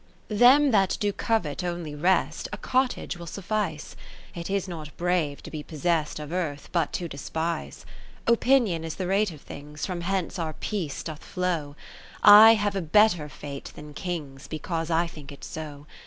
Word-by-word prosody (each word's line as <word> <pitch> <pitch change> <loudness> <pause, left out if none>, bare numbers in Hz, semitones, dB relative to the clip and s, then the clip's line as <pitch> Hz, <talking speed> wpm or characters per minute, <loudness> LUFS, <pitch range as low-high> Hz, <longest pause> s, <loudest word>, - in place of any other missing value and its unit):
~ - - -33
Them 255 +6 +6
that 195 -4 +3
do 205 -1 0
covet 195 -7 -1
only 175 -3 -4
rest, 175 +6 +1
A - - -4
cottage 255 -7 0
will 170 -1 -9
suffice: 195 -3 -3 0.4
It 170 +1 -6
is 195 -1 -1
not 155 -4 -8
brave 170 -5 0
to - - -9
be 155 - -5
possest 155 +1 -1
Of 150 0 -7
Earth, 155 -6 -3
but 170 -2 +1
to 175 - -2
despise. 160 +3 -4 0.4
Opinion 235 -7 +3
is 165 -1 -5
the 185 - -3
rate 200 +3 +2
of 150 -3 -12
things, 150 +1 -7
From 180 -2 -4
hence 190 0 -2
our 160 -2 -2
peace 165 -3 -4
doth 155 -2 -7
flow; 170 -6 -2 0.5
(i58) - - +8
I 220 +2 +11
have 205 -2 -1
a 195 - 0
better 175 -2 +3
Fate 140 0 -8
than 150 0 -10
Kings, 150 -5 -5
Because 165 +1 -3
I 165 +1 +2
think 150 -4 -10
it 140 - -12
so. 150 -2 -7
170 Hz, 180 wpm, -26 LUFS, 150-195 Hz, 0.5 s, I